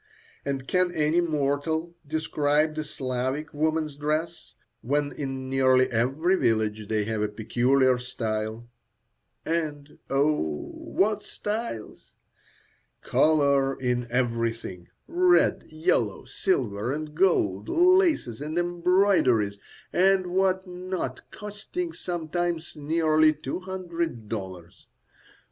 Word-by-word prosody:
And 135 -1 -3
can 180 -1 +2
any 155 +2 +3
mortal 160 +1 -1
describe 155 0 +1
the 155 0 -3
Slavic 130 +1 -3
woman's 155 0 0
dress, 155 +3 -3 0.3
when 145 +3 0
in 135 -2 -5
nearly 130 -1 +3
every 135 +11 +2
village 110 - 0
they 110 -1 0
have 110 0 -2
a 105 - +1
peculiar 125 +4 +2
style? 110 -2 -4 0.8
And, 150 -3 -3
oh! 135 - 0
what 210 +1 0
styles! 210 - -5 0.9
Colour 140 -3 +3
in 125 -2 -1
everything; 115 -7 -2 0.2
red, 360 +1 +3
yellow, 155 - 0
silver, 125 - -1
and 150 +1 -4
gold, 110 - +2
laces 345 - +3
and 155 +3 -4
embroideries 175 - +2 0.3
and 190 +1 +4
what 190 +1 +1
not, 180 0 -5
costing 210 - -6
sometimes 175 -1 -3
nearly 155 +1 +3
two 150 +1 -5
hundred 170 - -4
dollars. 95 -5 -7
150 Hz, 100 wpm, -26 LUFS, 125-175 Hz, 0.9 s, and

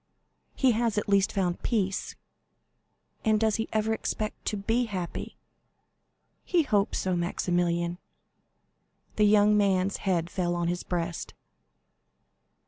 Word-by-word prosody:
"He 260 -2 +4
has 230 -1 0
at 210 - 0
least 200 -1 +3
found 180 -3 -1
peace." 195 -5 -1 1.1
"And 215 -2 +3
does 220 -1 +2
he 225 - -3
ever 220 0 +1
expect 215 -1 -3
to 210 - -1
be 225 +5 +1
happy?" 185 -6 -5 1.1
"He 350 -3 +2
hopes 210 -8 +1
so, 185 -1 0
Maximilian." 175 0 0 1.2
The 210 - +5
young 210 0 +5
man's 195 -2 +2
head 175 -4 0
fell 175 -2 -1
on 170 0 0
his 175 0 -2
breast. 170 -1 -4
200 Hz, 125 wpm, -28 LUFS, 175-215 Hz, 1.2 s, The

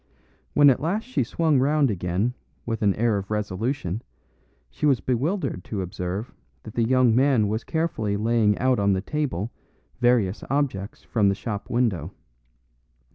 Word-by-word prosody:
When 145 -1 +7
at 125 - 0
last 190 +8 -1
she 255 - -1
swung 150 +3 +1
round 140 -1 +3
again 95 +5 -1 0.3
with 115 -2 -3
an 100 -3 +3
air 110 -2 +1
of 100 - -8
resolution 105 0 -2 0.7
she 150 - -1
was 135 -4 +3
bewildered 130 - -1
to 100 -4 -3
observe 95 +4 -4 0.3
that 110 - -9
the 120 - 0
young 125 -1 +4
man 130 -5 +3
was 110 +2 -2
carefully 115 -11 -1
laying 110 -1 +2
out 130 -2 +2
on 100 -1 +3
the 95 - 0
table 120 - -2 0.5
various 120 -5 +2
objects 130 -8 -2
from 105 -4 +2
the 100 - +1
shop 105 -1 -5
window. 100 - 0
115 Hz, 155 wpm, -25 LUFS, 100-135 Hz, 0.7 s, When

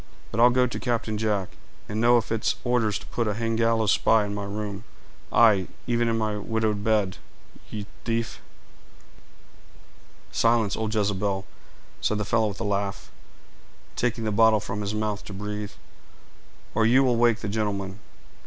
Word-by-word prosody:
"But 115 - -3
I'll 120 +1 +8
go 125 +1 +3
to 125 - -4
Captain 115 -3 -1
Jack, 105 -3 0 0.4
and 105 +1 -2
know 120 +1 +6
if 115 - -2
it's 115 -1 +1
orders 120 -4 +1
to - - -11
put 115 -2 -2
a 105 - -1
hang 115 0 -1
gallows 115 -2 +2
spy 110 -2 +4
in 100 - -4
my 100 0 -4
room; 100 0 -5 0.5
aye, 105 -6 +5 0.2
even 120 -1 +1
in 115 0 +1
my 110 -2 -1
widowed 110 -1 -1
bed, 105 -4 +1 0.5
you 105 -2 -5 0.2
tief!" 115 0 -2 1.9
"Silence, 115 -3 +2
old 110 0 -2
Jezebel!" 100 -1 0 0.6
said 110 - +1
the 105 - -2
fellow 110 +1 +2
with 100 -1 -5
a - - -2
laugh, 100 -1 -2 0.8
taking 120 -1 -1
the 110 - 0
bottle 110 +1 +5
from 100 +1 -4
his 105 +1 -3
mouth 105 -1 -2
to 100 - -8
breathe, 105 +1 -5 1.0
"or 115 - +2
you 125 +4 +5
will 125 -2 +3
wake 120 -1 +3
the 105 - -3
gentleman. 100 -2 -2
110 Hz, 165 wpm, -26 LUFS, 105-115 Hz, 1.9 s, I'll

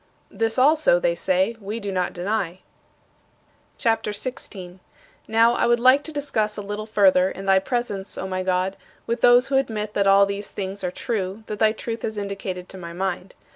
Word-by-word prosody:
"This 225 +1 -1
also," 315 - +4
they - - +1
say, 280 - 0
"we 210 +3 -4
do 200 -2 -4
not 185 -1 -1
deny." 185 -1 -3 1.2
CHAPTER 225 -2 0
XVI 250 +6 -3
23. 185 -2 -10 0.5
Now, 230 +2 +4
I 240 - +1
would 240 0 +3
like 255 +3 +5
to 315 - -4
discuss 230 -8 -1
a 205 - -4
little 205 +2 -5
further, 190 -3 +4
in 195 0 -8
thy 190 -1 +5
presence, 205 -3 -3
O 190 - -4
my 185 0 -2
God, 185 +1 -1 0.3
with 235 +1 -2
those 245 +1 +5
who 270 - +2
admit 215 -5 -2
that 200 -1 +1
all 195 0 +6
these 200 +1 -5
things 195 0 -5
are 180 - 0
true 195 +1 -4
that 210 -2 -6
thy 215 -1 +4
Truth 225 +1 -5
has 220 -1 -4
indicated 195 -2 -5
to 190 - -9
my 170 -1 -8
mind. 185 +1 -4
210 Hz, 195 wpm, -23 LUFS, 190-235 Hz, 1.2 s, all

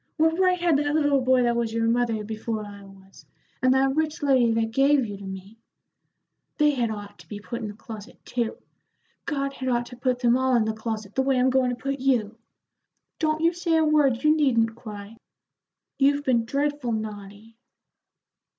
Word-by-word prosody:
What 320 +2 +2
right 365 -1 +3
had 340 -4 +3
that 290 0 0
little 290 -3 +3
boy 255 0 +3
that 240 0 +1
was 235 -1 -1
your 230 0 0
mother 230 -2 +1
before 220 0 -4
I 205 -1 -11
was, 195 0 -17 0.4
and 255 +1 +4
that 270 0 +2
rich 310 -1 -1
lady 260 -5 +4
that 225 0 0
gave 275 +1 +3
you 205 -2 -6
to 200 - -11
me? 190 +3 -9 1.0
They 300 -1 +4
had 245 -5 -1
ought 205 -2 -8
to - - -16
be 205 - -7
put 235 +3 -6
in 220 - -4
the 205 - -8
closet, 220 +1 -11
too. 235 -2 -2 0.7
God 275 -2 -2
had 260 -1 -4
ought 240 -1 0
to 245 - -11
put 255 0 0
them 240 -1 +3
all 260 0 +2
in 230 -2 +3
the 220 - -1
closet, 220 -2 -5
the 265 - +1
way 265 -1 +1
I'm 255 +1 +3
goin' 260 -1 +2
to 245 - -2
put 275 +2 -4
you. 235 -4 0 0.8
Don't 310 0 0
you 335 +1 +4
say 340 -1 0
a 320 - +3
word; 290 -5 +2
you 305 0 +5
needn't 230 -7 +2
cry; 210 -1 -10 0.8
you've 285 +1 +3
been 240 -4 +1
dreadful 280 -1 -1
naughty." 210 0 -7
245 Hz, 195 wpm, -25 LUFS, 220-280 Hz, 1.0 s, you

